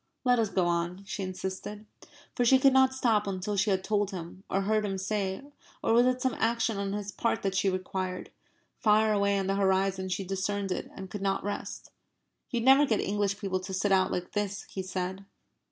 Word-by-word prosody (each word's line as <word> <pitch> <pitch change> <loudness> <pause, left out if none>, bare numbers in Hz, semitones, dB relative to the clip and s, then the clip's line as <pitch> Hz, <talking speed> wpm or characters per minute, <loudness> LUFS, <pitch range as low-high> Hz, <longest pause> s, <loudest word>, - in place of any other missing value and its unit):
"Let 250 -2 +3
us 220 -3 +1
go 185 -3 +1
on," 175 +2 -1
she 195 - -5
insisted. 190 +3 -5 0.5
For 245 - +1
she 265 +2 +6
could 270 0 +5
not 265 0 +4
stop 225 -5 +2
until 195 +1 -2
she 205 +2 +2
had 190 -1 +1
told 205 -1 +1
him 185 0 -8
or 195 - +1
heard 215 +2 +1
him 195 -2 -2
say 190 +2 -2 0.4
or - - +2
was 240 +2 +5
it 255 0 0
some 260 - +1
action 230 -1 +1
on 200 0 -2
his 205 -1 -4
part 230 +4 -1
that 195 -1 0
she 195 +1 +2
required? 185 0 -3 0.5
Far 215 0 +4
away 200 -1 +2
on 195 - -1
the 195 - 0
horizon 190 -1 +1
she 185 +2 -2
discerned 195 +1 -2
it 180 - -3
and 190 -1 -8
could 205 - -5
not 195 0 0
rest. 205 +1 -5 0.6
"You'd 240 -3 -1
never 270 +3 +6
get 220 -4 +1
English 200 -1 0
people 195 -3 -2
to 185 +1 -5
sit 195 +2 0
out 190 -1 +3
like 180 0 -3
this," 205 -1 -2
he 190 - -6
said. 185 +1 -4
200 Hz, 210 wpm, -29 LUFS, 190-215 Hz, 0.6 s, she